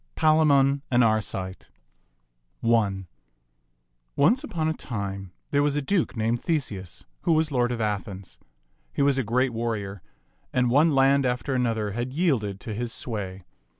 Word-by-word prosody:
PALAMON 145 -3 +4
AND 125 -1 +4
ARCITE 100 -4 -1 0.9
ONCE 105 -5 +2 1.4
upon 160 -2 -2
a 160 - +1
time 100 - -5 0.2
there 145 -1 +3
was 145 0 +1
a 145 - 0
duke 175 - 0
named 115 +2 0
The 165 +4 +1
seus 100 - -7 0.2
who 165 - +2
was 160 -1 +2
lord 125 -2 +1
of 120 - -3
Athens. 100 -3 -4 0.5
He - - 0
was 140 -1 +3
a - - +1
great 125 +3 +1
warrior, 105 -4 -3 0.5
and 125 -1 +1
one 150 +3 +4
land 135 +1 +4
after 125 +2 -1
another 115 -5 0
had 120 +5 -4
yielded 125 - 0
to 115 -4 -5
his 120 +2 -3
sway. 95 -7 -5
120 Hz, 150 wpm, -25 LUFS, 105-140 Hz, 1.4 s, PALAMON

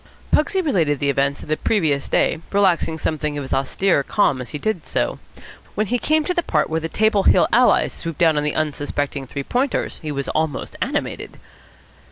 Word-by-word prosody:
Pugsy 380 +5 +2
related 170 - +1
the 140 +1 +1
events 140 +1 0
of - - -11
the 155 - +1
previous 155 -10 0
day, - - +2
relaxing 185 -5 +2
something 150 -2 -2
of 145 - -3
his 135 - -5
austere 140 +5 +1
calm 140 -4 +1
as 125 - -7
he - - -4
did 200 0 -3
so. - - -1 0.6
When 215 - +1
he 245 +4 -1
came 310 +4 +2
to 360 - -1
the 350 - +1
part 155 - 0
where 160 - +1
the 165 0 -4
Table 215 0 +2
Hill 180 -3 +4
allies 250 +1 +4
swooped 165 -2 -6
down 165 -3 +4
on 150 - 0
the 150 - -1
unsuspecting 145 -2 -2
Three 140 +2 -5
Pointers, 255 - -1
he 155 -2 -4
was 140 -1 -3
almost 155 -3 -2
animated. - - -3
160 Hz, 200 wpm, -21 LUFS, 145-205 Hz, 0.6 s, Hill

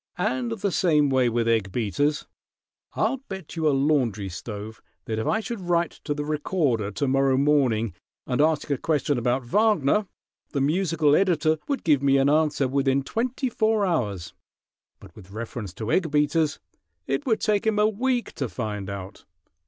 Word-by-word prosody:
"And 125 -2 -1
the 200 - -2
same 150 -4 +3
way 130 -2 +3
with 115 0 0
egg 110 -4 +1
beaters. 125 - 0 0.7
I'll 270 - +1
bet 190 -5 -7
you 160 -1 0
a - - +5
laundry 135 -8 +1
stove 105 +4 -7 0.2
that 110 -1 -2
if 110 - -2
I 220 - +1
should 220 0 -5
write 170 -1 +1
to 145 - -1
the 145 0 -3
Recorder 150 - 0
to 135 +7 -2
morrow 135 0 +2
morning, 130 - +2 0.3
and 125 +2 0
ask 155 -1 +1
a 140 - 0
question 145 -4 0
about 125 +2 0
Wagner, 210 - +2 0.5
the 140 - 0
musical 155 -1 +2
editor 160 -4 +2
would 280 -2 -2
give 150 -5 +3
me 140 -1 +4
an 135 +1 +3
answer 150 -3 +2
within 135 0 +1
twenty 250 - -2
four 220 -3 +1
hours; 105 - -2 0.7
but - - -15
with 95 -3 -14
reference 110 -1 -6
to 110 0 -4
egg 175 -4 +2
beaters 150 +1 +1 0.5
it 135 - -2
would 225 -3 +2
take 210 +1 +1
'em 215 -1 +2
a 210 0 +4
week 240 +3 -1
to - - -3
find 105 -4 -4
out. 100 -1 -8
145 Hz, 175 wpm, -25 LUFS, 120-170 Hz, 0.7 s, a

